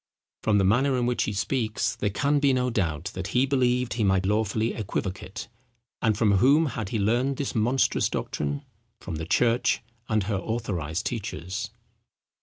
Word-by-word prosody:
From 105 Hz, -2 st, +2 dB
the 100 Hz, -, +3 dB
manner 130 Hz, +7 st, +3 dB
in 120 Hz, -, +1 dB
which 120 Hz, 0 st, +1 dB
he -, -, -2 dB
speaks, 110 Hz, +1 st, -1 dB
there 105 Hz, -, -1 dB
can 140 Hz, +8 st, +1 dB
be 140 Hz, -2 st, +3 dB
no 125 Hz, -1 st, +1 dB
doubt, 90 Hz, -4 st, -1 dB
that 95 Hz, 0 st, -4 dB
he 130 Hz, -, +5 dB
believed 125 Hz, -3 st, +1 dB
he 115 Hz, -, -1 dB
might 95 Hz, -1 st, +2 dB
lawfully 110 Hz, +2 st, +1 dB
equivocate. 95 Hz, -2 st, -4 dB, 0.5 s
And 110 Hz, -3 st, +2 dB
from 105 Hz, -3 st, +3 dB
whom 140 Hz, +10 st, +5 dB
had 115 Hz, -8 st, -3 dB
he 115 Hz, -, -1 dB
learned 120 Hz, +6 st, +1 dB
this 140 Hz, -, -2 dB
monstrous 120 Hz, +4 st, +2 dB
doctrine? 70 Hz, -1 st, -3 dB, 0.3 s
From 80 Hz, -, -6 dB
the 80 Hz, 0 st, -5 dB
church 115 Hz, +3 st, +2 dB, 0.3 s
and 110 Hz, -2 st, +2 dB
her 100 Hz, 0 st, -1 dB
authorized 95 Hz, -7 st, -3 dB
teachers!! 105 Hz, -1 st, -4 dB
110 Hz, 170 wpm, -26 LUFS, 95-125 Hz, 0.5 s, he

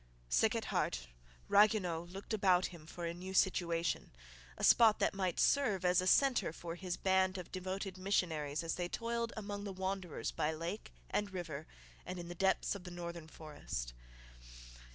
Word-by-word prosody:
Sick -, -, +3 dB
at -, -, -1 dB
heart, 60 Hz, 0 st, -1 dB, 0.4 s
Ragueneau 200 Hz, -6 st, +4 dB
looked 195 Hz, +4 st, -7 dB
about 190 Hz, -3 st, +4 dB
him 160 Hz, -2 st, -12 dB
for 170 Hz, +1 st, -6 dB
a 170 Hz, -, -2 dB
new 185 Hz, +2 st, -7 dB
situation, 170 Hz, -4 st, +1 dB, 0.5 s
a -, -, -6 dB
spot 225 Hz, -3 st, +7 dB
that -, -, +1 dB
might 190 Hz, -2 st, -1 dB
serve 215 Hz, -10 st, +3 dB
as 180 Hz, +1 st, +4 dB
a 185 Hz, -, -2 dB
centre 250 Hz, -, +4 dB
for 165 Hz, +1 st, -6 dB
his 175 Hz, 0 st, -4 dB
band 190 Hz, 0 st, +2 dB
of 180 Hz, -, -7 dB
devoted 185 Hz, 0 st, -4 dB
missionaries 160 Hz, -6 st, 0 dB
as 165 Hz, -, -1 dB
they 175 Hz, -1 st, -2 dB
toiled 235 Hz, +1 st, -2 dB
among 205 Hz, -1 st, -4 dB
the 200 Hz, -, -4 dB
wanderers 190 Hz, -2 st, -3 dB
by 150 Hz, -, 0 dB
lake 170 Hz, +6 st, -5 dB, 0.2 s
and 205 Hz, -1 st, 0 dB
river 165 Hz, -5 st, -5 dB, 0.4 s
and 185 Hz, -, -6 dB
in 175 Hz, -1 st, -6 dB
the -, -, -4 dB
depths 190 Hz, +2 st, +1 dB
of 200 Hz, -3 st, -7 dB
the 180 Hz, -, -7 dB
northern 170 Hz, -2 st, -6 dB
forest. 145 Hz, -, -6 dB
180 Hz, 175 wpm, -35 LUFS, 170-195 Hz, 0.5 s, spot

